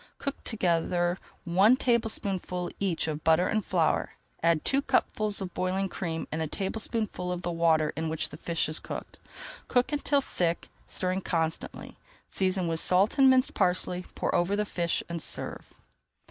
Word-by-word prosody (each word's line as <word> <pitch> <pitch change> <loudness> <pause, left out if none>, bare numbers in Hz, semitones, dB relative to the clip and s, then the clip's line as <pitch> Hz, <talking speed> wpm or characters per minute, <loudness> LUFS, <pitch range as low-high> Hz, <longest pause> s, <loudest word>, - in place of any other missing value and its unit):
Cook 280 0 -4
together 175 -3 +1 0.3
one 190 +7 +5
tablespoonful 200 -8 -1
each 185 -5 0
of 155 0 -3
butter 160 +3 +4
and 215 - +1
of 210 - -8
flour, 170 -4 +1 0.3
add 165 -1 +2
two 275 +1 +2
cupfuls 215 -6 0
of 185 -2 -5
boiling 190 +1 -1
cream 165 -3 -4
and 160 - -2
a 160 - -1
tablespoonful 200 0 -2
of 180 0 -4
the 175 - -1
water 160 -2 +2
in 160 +1 -2
which 160 0 -2
the 150 - -9
fish 165 0 -1
is 155 +1 0
cooked. - - -7 0.5
Cook 250 +2 +2
until 290 -1 +2
thick, 175 -10 -1 0.2
stirring 185 +1 -1
constantly, 165 -3 -3 0.3
season 185 -2 +1
with 165 -1 0
salt 190 - +3
and 270 -1 +8
minced 260 +1 +4
parsley, 180 -1 +1
pour - - -1
over 175 +3 +2
the 210 +1 0
fish, 170 -4 -1
and 170 -1 -4
serve. - - -3
180 Hz, 165 wpm, -28 LUFS, 165-205 Hz, 0.5 s, and